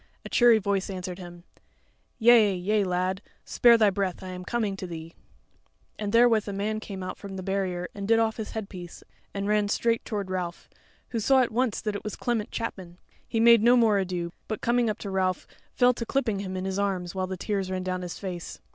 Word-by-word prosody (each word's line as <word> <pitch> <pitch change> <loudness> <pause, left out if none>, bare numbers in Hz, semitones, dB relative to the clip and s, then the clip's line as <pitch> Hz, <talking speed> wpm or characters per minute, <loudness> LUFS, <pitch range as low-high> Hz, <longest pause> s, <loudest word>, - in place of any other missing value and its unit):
A - - -6
cheery 240 -2 +6
voice 200 -2 -1
answered 185 -1 -5
him: 175 -1 -10 0.7
"Yea, 225 -4 +6
yea, 205 +4 +1
lad; 185 +1 -1 0.2
spare 235 -1 +5
thy 215 -3 +4
breath; 190 -2 -2
I 185 - -6
am 180 0 -7
coming 215 -1 -1
to 185 - -6
thee." 165 -1 -8 0.9
And 210 -1 -2
therewith 230 -2 +4
a 200 - -3
man 210 +2 -2
came 195 -3 -7
from - - -4 0.3
out 190 - -6
the 185 - -5
barrier 185 -2 -2
and 200 -1 -5
did 225 +1 +5
off 225 -1 +1
his 220 -2 -5
headpiece 190 -5 -7 0.3
and 200 0 -3
ran 210 -1 +2
straight 230 +2 +1
toward 200 -4 -4
Ralph, 180 -2 -4 0.4
who 235 - -2
saw 265 +4 +4
at 245 - 0
once 245 0 0
that 210 -2 -2
it - - -5
was 215 - -5
Clement 230 -3 -2
Chapman; 185 -6 -5 0.3
he 225 - -1
made 235 -1 +7
no 240 +2 +6
more 220 -4 +4
ado, 180 -2 -3 0.2
but 215 - -3
coming 240 -1 +2
up 215 - -2
to 200 - -6
Ralph 185 -1 0 0.3
fell 250 0 +5
to 235 - -5
clipping 235 -7 0
him 190 -1 -4
in 185 - -3
his 190 +1 -2
arms, 185 -3 -1
while 185 -1 -2
the 190 0 -5
tears 195 0 -2
ran 185 0 -2
down 185 0 -2
his 180 -1 -6
face. 180 -3 -6
200 Hz, 220 wpm, -27 LUFS, 185-225 Hz, 0.9 s, made